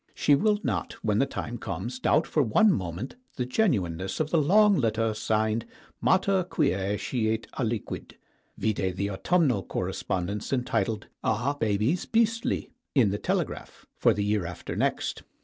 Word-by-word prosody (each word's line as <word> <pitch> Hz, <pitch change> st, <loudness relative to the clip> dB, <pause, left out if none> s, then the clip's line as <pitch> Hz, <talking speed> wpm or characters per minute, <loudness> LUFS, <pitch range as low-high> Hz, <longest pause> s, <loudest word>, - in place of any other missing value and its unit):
She 145 Hz, -, +3 dB
will 210 Hz, +8 st, +3 dB
not, -, -, -2 dB
when -, -, +2 dB
the -, -, +3 dB
time -, -, -5 dB
comes, 255 Hz, -, -4 dB
doubt 160 Hz, -10 st, +3 dB
for 155 Hz, -, +1 dB
one 145 Hz, -, +4 dB
moment 95 Hz, -, -4 dB, 0.2 s
the 125 Hz, -, -1 dB
genuineness 95 Hz, -, 0 dB
of 155 Hz, -1 st, -1 dB
the 165 Hz, -, +4 dB
long 205 Hz, +6 st, +5 dB
letter 115 Hz, -3 st, +1 dB
signed 110 Hz, +1 st, 0 dB, 0.4 s
"Mater 190 Hz, 0 st, +3 dB
Quce 105 Hz, -, 0 dB
Scit 110 Hz, -1 st, -1 dB
Aliquid" 115 Hz, -4 st, -3 dB, 0.4 s
vide 95 Hz, -4 st, -1 dB
the 100 Hz, +2 st, -2 dB
autumnal 125 Hz, -, +2 dB
correspondence, 95 Hz, +2 st, -3 dB
entitled 120 Hz, -4 st, 0 dB, 0.2 s
"Are 120 Hz, +6 st, +1 dB
Babies 110 Hz, -, 0 dB
Beastly?" 230 Hz, +1 st, +1 dB, 0.2 s
in 115 Hz, -8 st, +4 dB
the 100 Hz, -, -2 dB
"Telegraph" -, -, -3 dB
for -, -, +4 dB
the 100 Hz, +1 st, 0 dB
year 105 Hz, -4 st, 0 dB
after 90 Hz, -, -6 dB
next. -, -, -1 dB
115 Hz, 150 wpm, -27 LUFS, 100-155 Hz, 0.4 s, long